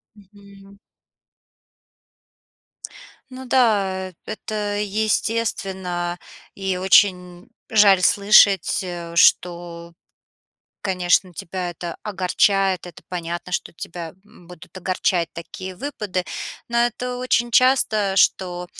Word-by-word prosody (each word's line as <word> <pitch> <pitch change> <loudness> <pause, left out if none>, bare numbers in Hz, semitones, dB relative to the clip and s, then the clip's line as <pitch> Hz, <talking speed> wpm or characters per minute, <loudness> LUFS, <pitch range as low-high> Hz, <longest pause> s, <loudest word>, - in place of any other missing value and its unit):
Мгм. 200 -1 -18 2.5
Ну 260 +1 -9
да, 200 -7 +1
э - - -19
это 210 -1 -4
естественно. 195 -4 -2 0.4
И 190 -2 -2
очень 180 -1 +2 0.2
жаль 200 -3 +5
слышать, 200 +1 +4
э, 170 -2 -7
что, 170 -1 +2 0.9
конечно, 180 -1 +1
тебя 180 +2 -5
это 175 0 -7
огорчает. 195 -1 +1
Это 175 - -12
понятно, 175 0 -5
что 175 - -3
тебя, 165 -1 -8
м, 185 -4 -20
будут 180 -2 -14
огорчать 180 -2 0
такие 185 +2 -8
выпады. 205 -7 -4 0.4
Но 235 - 0
это 250 +1 -5
очень 240 -1 0
часто, 220 -6 +3
что, 180 -2 +1
190 Hz, 95 wpm, -21 LUFS, 180-210 Hz, 2.5 s, жаль